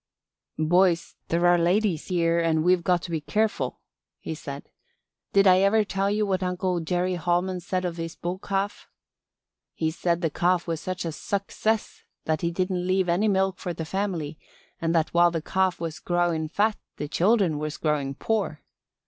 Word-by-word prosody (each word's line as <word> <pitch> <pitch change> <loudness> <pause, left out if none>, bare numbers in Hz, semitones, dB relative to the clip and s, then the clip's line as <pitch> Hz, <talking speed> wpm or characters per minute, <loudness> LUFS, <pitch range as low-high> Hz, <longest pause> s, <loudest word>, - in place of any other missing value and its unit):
"Boys, 170 +2 +2
there 170 +1 +1
are 175 0 +5
ladies 180 -1 +1
here 170 -2 +2
and 160 -2 +2
we've 180 0 +3
got 180 0 +2
to 170 - -6
be 160 -2 -1
careful," 215 +7 -1 0.4
he - - -5
said. - - -8 0.6
"Did 200 0 +4
I 185 -1 +7
ever 200 +3 +4
tell 195 -1 -1
you 210 +1 +1
what 190 -2 0
Uncle 180 0 -1
Jerry 180 +2 0
Holman 175 +2 0
said 185 +1 -2
of 175 -1 -3
his 165 -1 -5
bull 175 +2 -4
calf? 195 +1 -3 0.9
He 160 -1 0
said 170 +1 0
the 165 -3 0
calf 175 +2 +1
was 165 -2 -3
such 185 -1 -4
a 165 - -2
suckcess 205 +5 -2 0.2
that 155 -1 0
he 170 - +1
didn't 180 +1 -1
leave 185 -1 +2
any 185 +6 +2
milk 190 -1 +1
for 175 -2 -4
the 160 - -4
family 170 -5 -3 0.4
and 165 0 0
that 160 -1 +1
while 175 0 +6
the 165 -1 -2
calf 190 +3 0
was 165 -2 -4
growin' 175 -3 0
fat 210 +6 +1 0.2
the 150 - -4
children 180 -2 +2
was 150 0 -4
growin' 145 -3 -1
poor. 200 -5 -1
175 Hz, 180 wpm, -26 LUFS, 165-190 Hz, 0.9 s, I